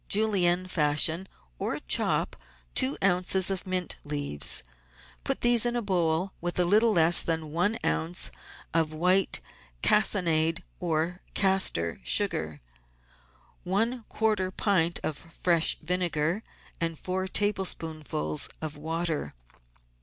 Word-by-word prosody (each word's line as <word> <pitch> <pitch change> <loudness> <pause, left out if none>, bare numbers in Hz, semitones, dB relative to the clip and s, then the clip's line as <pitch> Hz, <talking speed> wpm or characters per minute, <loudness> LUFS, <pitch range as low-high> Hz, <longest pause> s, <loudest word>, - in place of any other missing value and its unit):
Julienne 185 -4 +2
fashion, 160 +2 +2 0.3
or - - -2
chop, - - 0 0.4
two 135 - +2
oz. 190 0 +3
of 190 -1 -4
mint 185 -2 -1
leaves. 145 - +1 0.6
Put - - -2
these 240 -2 +4
in 240 0 +1
a 240 - -1
bowl 180 -1 0
with 175 0 -3
a 180 - +3
little 215 +5 +3
less 170 -3 +5
than 160 -2 -3
one 180 +8 0
oz. 80 +3 0 0.4
of 160 -1 +1
white 185 +4 +2 0.4
cassonade 170 -5 +2 0.2
or 170 +1 -2
castor 190 - +2
sugar, 80 - +1 1.0
one 225 +6 -1
quarter 215 -4 0
pint 185 -3 0
of 155 - -2
fresh 170 0 +1
vinegar, 175 +1 -1 0.4
and 165 -1 -2
four 185 +3 -3
tablespoonfuls 160 - -1
of 155 -1 -6
water. 160 - -4
175 Hz, 115 wpm, -27 LUFS, 155-190 Hz, 1.0 s, less